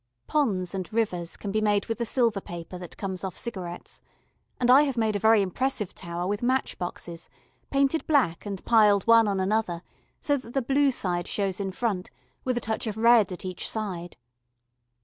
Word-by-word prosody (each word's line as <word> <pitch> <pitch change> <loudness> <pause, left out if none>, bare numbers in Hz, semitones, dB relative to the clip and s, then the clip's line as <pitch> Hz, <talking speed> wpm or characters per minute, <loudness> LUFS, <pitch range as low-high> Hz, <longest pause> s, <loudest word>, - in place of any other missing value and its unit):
Ponds 200 - 0
and 185 -2 -4
rivers 185 -7 -1
can 200 - -5
be 215 +2 +1
made 205 -2 +2
with 225 +1 -3
the 235 - -1
silver 230 -4 +1
paper 175 +1 -8
that 175 -2 -10
comes 190 -2 -4
off 190 -2 -5
cigarettes, 180 -7 -6 0.6
and 245 0 +4
I 270 +3 +8
have 275 -4 0
made 220 -2 +1
a - - 0
very 220 0 +5
impressive 210 +1 -2
tower 175 -1 -5
with 205 +2 -2
match 255 +2 0
boxes, 175 -1 -6 0.4
painted 275 +3 +1
black 265 - +2
and 200 -3 -6
piled 210 -4 +5
one 230 -1 +6
on 200 -2 0
another 190 -3 0 0.4
so 290 -1 +1
that 245 -2 -11
the 270 - +2
blue 275 +3 +3
side 180 -8 -1
shows 195 -2 -2
in 195 -1 -2
front, 195 -3 -2 0.3
with 255 -1 -1
a - - -1
touch 220 +1 -2
of 215 -1 -3
red 230 -3 +5
at 180 - -7
each 185 -1 -3
side. 185 -6 -4
210 Hz, 190 wpm, -26 LUFS, 185-235 Hz, 0.6 s, I